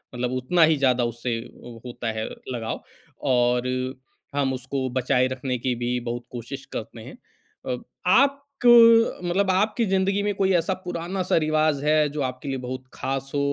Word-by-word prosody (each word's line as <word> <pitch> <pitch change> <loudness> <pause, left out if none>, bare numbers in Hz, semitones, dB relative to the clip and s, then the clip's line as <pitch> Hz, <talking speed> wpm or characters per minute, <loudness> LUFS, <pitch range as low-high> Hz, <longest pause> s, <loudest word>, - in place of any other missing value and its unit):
मतलब 125 0 -2
उतना 160 +7 +2
ही 155 -1 +4
ज़्यादा 130 -3 +2
उससे 120 0 -3 0.2
उ 120 -1 -10
होता 120 -2 -4
है 110 - -1 0.3
लगाव 115 -2 -4 0.5
और 125 0 +2 0.7
हम 135 -2 +1
उसको 130 +1 -3
बचाए 130 0 +2
रखने 130 0 -3
की 125 +1 -1
भी 120 +1 -1
बहुत 120 0 -5
कोशिश 125 +3 -7
करते - - -6
हैं। - - -11 0.6
अ, - - -3 0.3
आप 275 +8 +5 0.3
क - - +7 0.6
मतलब 190 +3 +1
आपकी 215 +5 +1
ज़िंदगी 195 +1 +1
में 205 0 0
कोई 195 -1 +1
ऐसा 175 +3 +1
पुराना-सा 180 +1 -2
रिवाज़ 155 -2 +1
है, 150 -1 +3
जो 145 +1 -4
आपके 130 +1 -5
लिए 135 - -2
बहुत 130 +1 -5
खास 135 0 -4
हो - - +2
135 Hz, 170 wpm, -24 LUFS, 125-170 Hz, 0.7 s, क